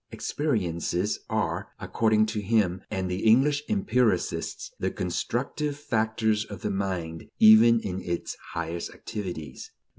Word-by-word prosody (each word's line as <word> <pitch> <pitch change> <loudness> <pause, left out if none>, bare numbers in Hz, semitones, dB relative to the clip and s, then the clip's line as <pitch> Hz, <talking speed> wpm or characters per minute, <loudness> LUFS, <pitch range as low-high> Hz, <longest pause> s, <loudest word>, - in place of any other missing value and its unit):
"Experiences" 95 - -1
are, - - -1
according 110 -1 +2
to 110 0 -3
him 100 -4 +1
and 95 -1 -2
the 90 +1 -2
English 135 +6 +4
empiricists, 125 - 0
the - - 0
constructive 135 - -2
factors 110 -4 0
of 100 -3 -9
the 105 - -1
mind 90 -5 -3
even 110 +2 +7
in 95 -1 -4
its 85 -1 -3 0.2
highest 85 0 -3
activities. 85 -9 -6
105 Hz, 120 wpm, -27 LUFS, 90-115 Hz, 0.2 s, even